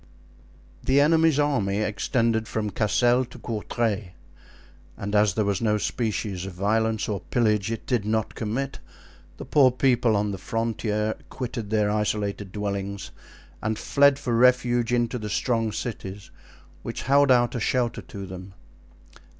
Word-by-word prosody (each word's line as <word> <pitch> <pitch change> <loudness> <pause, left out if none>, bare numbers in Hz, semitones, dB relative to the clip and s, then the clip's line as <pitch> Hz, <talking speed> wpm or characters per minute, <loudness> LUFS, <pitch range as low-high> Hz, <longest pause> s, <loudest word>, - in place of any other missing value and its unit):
The 135 +2 +3
enemy's 160 0 +4
army 125 -10 +1
extended 110 +1 0
from 105 -2 -2
Cassel 120 +5 +2
to - - -13
Courtray; 110 -3 -2 0.8
and 100 0 -5
as 105 -3 +3
there 110 - +1
was 100 +1 0
no 105 -2 +2
species 105 -4 -2
of 95 - -7
violence 110 +4 0
or 105 -2 -2
pillage 105 +1 +1
it 115 - -5
did 120 -5 0
not 110 +1 -1
commit, 125 +5 -3 0.6
the - - -7
poor 140 -3 +5
people 125 -3 +2
on 105 0 0
the 95 - -5
frontier 110 0 -1 0.2
quitted 120 -4 -5
their 105 -1 +2
isolated 105 -2 -2
dwellings 100 -1 -4 0.5
and 110 0 -1
fled 140 -1 +4
for 120 -4 -2
refuge 120 -1 +3
into 120 0 0
the 105 -1 -5
strong 115 +1 0
cities 100 -4 -6 0.5
which - - -5
held 140 +2 +4
out 120 -2 +4
a 120 - -2
shelter 120 +1 0
to 100 -1 -8
them. 95 +1 -9
110 Hz, 145 wpm, -25 LUFS, 105-120 Hz, 0.8 s, poor